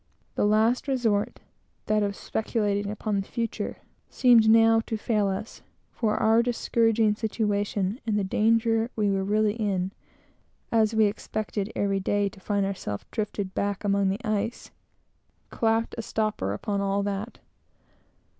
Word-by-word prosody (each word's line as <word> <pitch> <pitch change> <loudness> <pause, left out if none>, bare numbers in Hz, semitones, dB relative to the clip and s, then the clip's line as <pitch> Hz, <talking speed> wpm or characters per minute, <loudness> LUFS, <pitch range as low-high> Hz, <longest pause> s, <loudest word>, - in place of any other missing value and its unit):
The - - +1
last 220 +6 +2
resort, 230 -6 0 0.4
that 215 0 +2
of 200 -1 -1
speculating 205 -3 -1
upon 210 -1 -2
the 195 - -10
future, 230 -1 -3 0.3
seemed 235 -4 +5
now 225 0 +6
to 220 - -2
fail 215 -2 0
us, 195 +3 -5 0.3
for 215 -2 0
our 225 +1 +4
discouraging 230 -2 +2
situation, 205 0 -1
and 210 -2 +1
the 205 - +1
danger 225 +3 +2
we 210 -2 +1
were 195 0 0
really 210 +1 +2
in, 195 -4 -1 0.8
(as 220 -1 +2
we 220 -1 +5
expected 210 0 -3
every 195 -1 0
day 200 +1 0
to 195 - -16
find 200 +1 0
ourselves 185 - -4
drifted 205 -3 -3
back 200 0 -2
among 200 -1 +2
the 195 +3 -3
ice) 215 +2 -2 0.8
"clapped 225 0 0
a - - 0
stopper" 215 - -2
upon 200 - -2
all 200 0 0
that. 205 +3 -4
210 Hz, 145 wpm, -26 LUFS, 200-225 Hz, 0.8 s, now